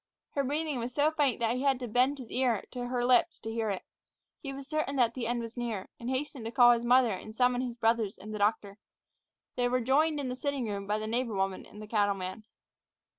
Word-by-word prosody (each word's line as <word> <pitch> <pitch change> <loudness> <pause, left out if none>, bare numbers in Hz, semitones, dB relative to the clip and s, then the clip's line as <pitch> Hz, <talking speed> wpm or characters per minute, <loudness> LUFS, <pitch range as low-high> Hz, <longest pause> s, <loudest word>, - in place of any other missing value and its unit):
Her 280 - 0
breathing 295 0 -1
was 240 +1 -5
so 300 +1 +3
faint 290 -5 +1
that 230 +1 +2
he - - -2
had 270 -2 +2
to 250 - -4
bend 255 +5 +2
his 250 -5 -10
ear 245 -5 +1
to 245 -1 -4
her 245 -1 -1
lips 250 +7 +4
to 225 - -5
hear 225 -1 -1
it. 195 -2 -3 0.6
He 275 - -6
was 275 0 -8
certain 310 -3 -1
that 240 -3 +3
the 235 -2 -3
end 240 0 -1
was 230 0 -7
near, 230 -6 -4
and 235 - -4
hastened 265 -2 -3
to 225 - -3
call 240 -1 +7
his 235 -1 +2
mother 245 -1 +5
and 215 +3 -6
summon 250 0 +3
his 245 -2 -4
brothers 225 -3 +1
and 215 +2 -9
the 210 - -4
doctor. 205 -1 0 0.8
They 245 -1 +2
were 255 +1 +2
joined 295 +5 +2
in 275 - -2
the 250 - -3
sitting 275 -2 -2
room 200 -1 -4
by 210 +1 +1
the 215 - -4
neighbor 230 0 -1
woman 195 -1 -2
and 210 - -13
the - - -9
cattleman. 205 -1 -1
245 Hz, 240 wpm, -30 LUFS, 220-260 Hz, 0.8 s, call